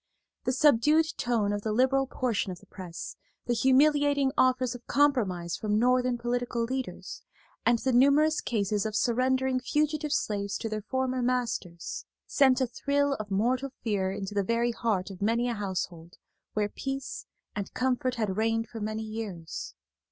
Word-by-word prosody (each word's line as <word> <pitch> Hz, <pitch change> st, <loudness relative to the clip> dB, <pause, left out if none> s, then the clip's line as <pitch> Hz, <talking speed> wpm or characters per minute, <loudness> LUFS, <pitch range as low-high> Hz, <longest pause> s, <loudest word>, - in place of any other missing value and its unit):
The -, -, +2 dB
subdued 300 Hz, +4 st, +4 dB
tone 225 Hz, -4 st, 0 dB
of 205 Hz, -, -2 dB
the 215 Hz, -, -2 dB
liberal 265 Hz, +4 st, +3 dB
portion 235 Hz, -7 st, -1 dB
of 180 Hz, -, -8 dB
the -, -, -19 dB
press, 185 Hz, -4 st, -8 dB, 0.3 s
the 240 Hz, -, +1 dB
humiliating 285 Hz, +2 st, +4 dB
offers 255 Hz, -1 st, +3 dB
of 245 Hz, -1 st, -11 dB
compromise 205 Hz, -, +1 dB
from 210 Hz, -1 st, 0 dB
Northern 250 Hz, +1 st, +3 dB
political 240 Hz, 0 st, -1 dB
leaders, 260 Hz, +2 st, -4 dB, 0.5 s
and 235 Hz, 0 st, +5 dB
the 260 Hz, +2 st, -1 dB
numerous 280 Hz, +5 st, +4 dB
cases 210 Hz, -2 st, 0 dB
of 215 Hz, -, -5 dB
surrendering 255 Hz, +2 st, +2 dB
fugitive 300 Hz, +3 st, 0 dB
slaves 200 Hz, -7 st, -1 dB
to 225 Hz, -, -4 dB
their 215 Hz, 0 st, -3 dB
former 260 Hz, +3 st, -1 dB
masters, 240 Hz, -9 st, -2 dB, 0.2 s
sent 265 Hz, -2 st, +4 dB
a -, -, +4 dB
thrill 280 Hz, +3 st, 0 dB
of 215 Hz, -1 st, -5 dB
mortal 250 Hz, +7 st, +1 dB
fear 195 Hz, -4 st, 0 dB
into 195 Hz, +1 st, -5 dB
the 205 Hz, -, +2 dB
very 230 Hz, +4 st, +1 dB
heart 210 Hz, -5 st, -1 dB
of 190 Hz, -, -11 dB
many 230 Hz, +4 st, +2 dB
a 240 Hz, -, 0 dB
household 185 Hz, -5 st, -4 dB, 0.4 s
where 210 Hz, -1 st, +1 dB
peace 270 Hz, +5 st, -5 dB, 0.3 s
and 200 Hz, -2 st, -5 dB
comfort 255 Hz, 0 st, 0 dB
had 215 Hz, -5 st, -1 dB
reigned 225 Hz, +1 st, 0 dB
for 225 Hz, -, -7 dB
many 215 Hz, +1 st, -3 dB
years. 215 Hz, -7 st, -6 dB
240 Hz, 160 wpm, -28 LUFS, 210-260 Hz, 0.5 s, and